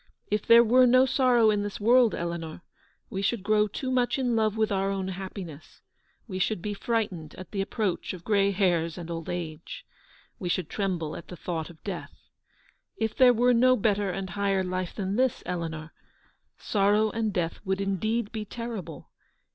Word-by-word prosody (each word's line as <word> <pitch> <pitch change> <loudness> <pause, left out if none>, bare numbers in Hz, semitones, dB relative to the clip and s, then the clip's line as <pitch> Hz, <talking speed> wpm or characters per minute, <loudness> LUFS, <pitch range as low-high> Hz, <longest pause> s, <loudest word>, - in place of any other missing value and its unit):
If 210 0 -1
there 235 0 +8
were 250 +2 +5
no 255 +2 +6
sorrow 245 -4 +4
in 205 -1 0
this 205 -1 -5
world, 235 +2 +4
Eleanor, 170 -1 -5 0.5
we 195 - -3
should 200 0 -1
grow 210 0 +3
too 255 +6 -4
much 250 0 +1
in 250 -3 0
love 220 -1 +1
with 220 -1 +1
our 195 0 +1
own 190 -1 -2
happiness; 185 -4 -8 0.4
we 185 -4 -4
should 215 +1 0
be 205 +4 -4
frightened 195 -8 -2
at 185 - -10
the 200 - -1
approach 195 -2 -2
of 180 -2 -9
grey 200 -1 +2
hairs 175 -4 +1
and 170 -1 -7
old 165 -1 -5
age; 165 -3 -6 0.5
we 180 - -3
should 175 -2 -1
tremble 180 -6 -2
at - - -9
the 180 - -8
thought 165 -2 -4
of 165 -2 -16
death. 195 -4 -6 0.8
If 220 -1 -2
there 255 -1 +7
were 245 +1 +3
no 255 +2 +5
better 205 -1 +1
and 190 0 -4
higher 195 0 0
life 185 -1 -3
than 195 0 -2
this, 255 -1 +1
Eleanor, 165 -3 -4 0.6
sorrow 210 +1 +2
and 225 -1 -1
death 170 -3 -2
would 190 0 -1
indeed 205 +3 -1
be 220 -2 -4
terrible. 210 - -7
200 Hz, 180 wpm, -27 LUFS, 180-225 Hz, 0.8 s, there